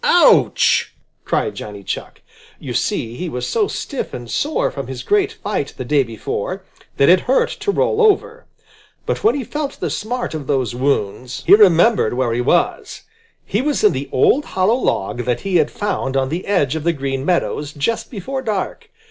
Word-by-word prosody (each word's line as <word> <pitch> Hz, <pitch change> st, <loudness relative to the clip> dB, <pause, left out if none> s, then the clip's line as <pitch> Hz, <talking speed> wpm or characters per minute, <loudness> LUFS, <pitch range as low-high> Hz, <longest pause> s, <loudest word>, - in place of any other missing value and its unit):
"Ouch!" -, -, +4 dB, 0.3 s
cried -, -, 0 dB
Johnny 105 Hz, -1 st, -8 dB
Chuck. -, -, -6 dB, 0.4 s
You -, -, -6 dB
see 115 Hz, +1 st, -1 dB
he 180 Hz, -, -4 dB
was 125 Hz, -4 st, -4 dB
so 430 Hz, -3 st, +1 dB
stiff 280 Hz, -, -5 dB
and 120 Hz, -1 st, -8 dB
sore 300 Hz, +2 st, 0 dB
from 140 Hz, -3 st, -6 dB
his 130 Hz, -2 st, -6 dB
great 410 Hz, 0 st, +2 dB
fight 205 Hz, -, -4 dB
the 130 Hz, -, -5 dB
day 145 Hz, +2 st, +3 dB
before, 115 Hz, -4 st, -4 dB, 0.3 s
that 140 Hz, -, +4 dB
it 180 Hz, +2 st, +7 dB
hurt 255 Hz, +8 st, +1 dB
to -, -, -3 dB
roll 440 Hz, +2 st, +1 dB
over. 455 Hz, +3 st, +2 dB, 0.6 s
But -, -, -2 dB
when 430 Hz, -, +4 dB
he 280 Hz, -, -2 dB
felt 290 Hz, +4 st, -4 dB
the -, -, -2 dB
smart 245 Hz, +1 st, -3 dB
of 150 Hz, -4 st, -5 dB
those 130 Hz, -4 st, 0 dB
wounds, 125 Hz, 0 st, -2 dB
he -, -, +6 dB
remembered 200 Hz, -, +5 dB
where 125 Hz, -2 st, 0 dB
he 120 Hz, -, 0 dB
was. 170 Hz, +7 st, 0 dB, 0.4 s
He 210 Hz, -, 0 dB
was 290 Hz, -2 st, -1 dB
in 210 Hz, -, +6 dB
the 135 Hz, +1 st, -4 dB
old 275 Hz, -, +3 dB
hollow 190 Hz, +4 st, +1 dB
log 125 Hz, -, -1 dB
that 125 Hz, -1 st, -1 dB
he 195 Hz, -2 st, +1 dB
had 155 Hz, -2 st, +2 dB
found 135 Hz, -10 st, -2 dB
on 130 Hz, -1 st, 0 dB
the 170 Hz, +5 st, -4 dB
edge 160 Hz, -8 st, +1 dB
of 160 Hz, -, -3 dB
the 170 Hz, +1 st, +2 dB
Green 135 Hz, -2 st, -3 dB
Meadows 150 Hz, -3 st, -1 dB
just 150 Hz, +11 st, -2 dB
before 265 Hz, +5 st, -5 dB
dark. 225 Hz, -, -3 dB
165 Hz, 190 wpm, -19 LUFS, -, 0.6 s, it